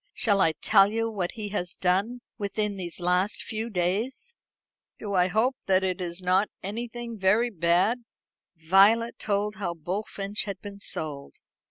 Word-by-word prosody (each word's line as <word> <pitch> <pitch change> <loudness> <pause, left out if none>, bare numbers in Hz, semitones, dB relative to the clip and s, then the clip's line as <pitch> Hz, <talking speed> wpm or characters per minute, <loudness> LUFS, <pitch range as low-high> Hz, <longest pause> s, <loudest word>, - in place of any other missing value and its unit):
Shall 200 -3 +2
I 160 - +4
tell 195 +5 +4
you 225 +1 -1
what 185 -5 -3
he 215 -2 -5
has 180 -3 -3
done 200 +7 0 0.2
within 210 0 -1
these 180 -3 -6
last 180 +3 +1
few 220 +1 -3
days?" 215 - -2 0.6
"Do. 205 -2 -5
I 180 -1 +4
hope 220 +7 +1
it 185 -1 +1
is 175 +1 -4
not 185 +3 +3
anything 235 +2 -5
very 210 +6 +3
bad." 180 +7 +2 0.5
Violet 195 +8 +4
told 210 0 -1
how 175 -4 -3
Bullfinch 195 +5 -3
had 200 -2 -5
been 200 -1 -9
sold. 145 -7 -4
200 Hz, 150 wpm, -27 LUFS, 180-220 Hz, 0.6 s, I